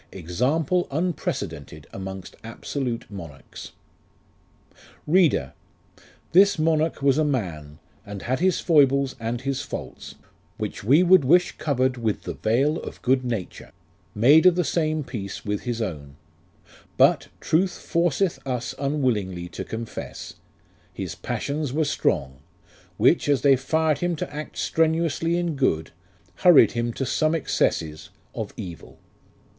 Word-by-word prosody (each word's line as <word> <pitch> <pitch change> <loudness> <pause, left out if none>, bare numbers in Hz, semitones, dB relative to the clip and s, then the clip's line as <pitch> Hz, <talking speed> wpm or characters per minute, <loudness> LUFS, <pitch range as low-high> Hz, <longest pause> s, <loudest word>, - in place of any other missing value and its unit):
Example 130 - 0
unprecedented 100 - -3
amongst 95 -1 -7
absolute 115 +1 -4
monarchs. 80 -8 -10 1.3
READEE. 150 - +3 0.8
This 195 +3 +5
monarch 155 -1 +1
was 140 +1 +3
a - - +3
man, 85 - -3 0.3
And 100 -1 -8
had 130 +2 -1
his 185 +1 +2
foibles 140 -4 +3
and 115 +1 -3
his 135 0 -2
faults; - - -8 0.4
Which - - -5
we 140 - +5
would 185 -3 +6
wish 175 +7 +4
covered 130 -3 0
with 110 -3 -2
the - - -4
veil 135 +8 +1
of - - -9
good 130 +1 +2
nature, 115 -7 -5 0.4
Made 145 - +6
of 180 - +5
the 180 - +1
same 155 0 0
piece 105 -7 -7
with 105 +2 -3
his 120 -2 -2
own: 70 -8 -6 0.8
But, - - +4
truth 180 +3 +1
forceth 170 +2 0
us 125 -2 -3
unwillingly 110 -12 -1
to - - -6
confess, 115 0 -7 0.6
His 95 -4 -5
passions 130 - -3
were 155 +1 +1
strong; 65 - -1 0.6
Which, - - +3
as 140 -3 +3
they 140 -2 +6
fired 155 +3 0
him 175 -1 0
to 150 - -5
act 150 +1 -7
strenuously 165 +1 +1
in 175 -3 -1
good, 80 - 0 0.5
Hurried 175 -5 +6
him 120 0 -2
to 135 - -3
some 155 +5 +1
excesses 80 - -1 0.2
of - - -5
evil. 85 -4 -9
135 Hz, 130 wpm, -24 LUFS, 105-155 Hz, 1.3 s, would